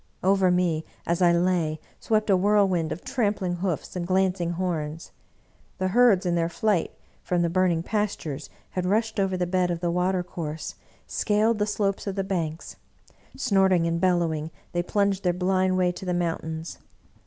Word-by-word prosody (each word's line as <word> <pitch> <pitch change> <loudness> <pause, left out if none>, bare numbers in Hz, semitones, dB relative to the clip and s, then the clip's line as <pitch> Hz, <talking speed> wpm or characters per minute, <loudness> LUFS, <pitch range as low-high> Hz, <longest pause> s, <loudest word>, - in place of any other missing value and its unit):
Over 190 0 +4
me, 175 -3 +1 0.2
as 170 +1 0
I 175 -1 +6
lay, 170 -3 +1 0.2
swept 215 -1 +1
a - - +6
whirl 205 +2 +4
wind 170 -4 -1
of 175 - -5
trampling 200 -6 -1
hoofs 180 -2 -3
and 175 -1 -3
glancing 185 -2 +1
horns. 165 -3 -3 0.7
The 185 -1 0
herds, 215 -3 +4
in 175 - +1
their 170 -1 +1
flight 200 -1 +1 0.3
from 175 -1 0
the 170 - 0
burning 180 -2 +2
pastures, 175 -9 -3 0.2
had 180 -1 -2
rushed 220 +2 0
over 190 -1 +1
the 180 - 0
bed 180 0 +1
of 170 -1 -2
the 170 0 -1
water 180 +1 +1
course, 160 -3 -5 0.3
scaled 215 +1 +1
the 210 - +1
slopes 205 -1 -1
of 195 - -2
the 195 - -1
banks. 170 -4 -3 0.6
Snorting 190 -7 +3
and 170 0 -1
bellowing, 170 -4 +1 0.2
they 175 - 0
plunged 200 +1 0
their 180 -1 +2
blind 185 +1 +1
way 180 -1 +2
to 180 - -8
the 180 -1 0
mountains. 165 -1 -3
180 Hz, 175 wpm, -26 LUFS, 170-195 Hz, 0.7 s, I